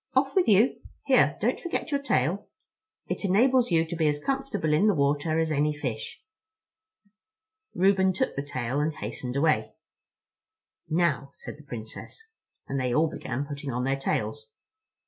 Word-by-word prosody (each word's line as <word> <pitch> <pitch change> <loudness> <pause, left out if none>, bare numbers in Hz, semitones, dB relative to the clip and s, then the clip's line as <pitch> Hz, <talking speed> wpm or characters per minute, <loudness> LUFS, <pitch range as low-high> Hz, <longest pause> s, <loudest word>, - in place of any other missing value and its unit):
Off - - +2
with 370 -3 +3
you! 215 +4 +4 0.2
Here, - - +4
don't - - 0
forget 340 -2 -3
your 280 -1 0
tail. 195 - 0 0.6
It - - -4
enables 240 +6 +3
you 165 -2 +3
to 165 - -5
be 160 -2 +1
as 150 0 +1
comfortable 265 - -1
in 165 +8 +4
the 210 - +3
water 145 +2 +1
as 160 -1 +1
any 150 0 +1
fish." 120 -7 -5 1.5
Reuben 190 0 +4
took 185 - -1
the 140 - -1
tail 130 -2 -3
and 150 +2 +1
hastened 125 0 -5
away. 155 +2 +1 1.1
"Now," 155 -5 +1
said - - -9
the 150 - -16
Princess. 125 - -9 0.4
And 135 0 -2
they 125 -1 0
all 160 +1 +3
began 130 +3 -4
putting 145 -1 -6
on 125 +1 -2
their 135 +1 +1
tails. 450 - -3
155 Hz, 160 wpm, -27 LUFS, 140-200 Hz, 1.5 s, you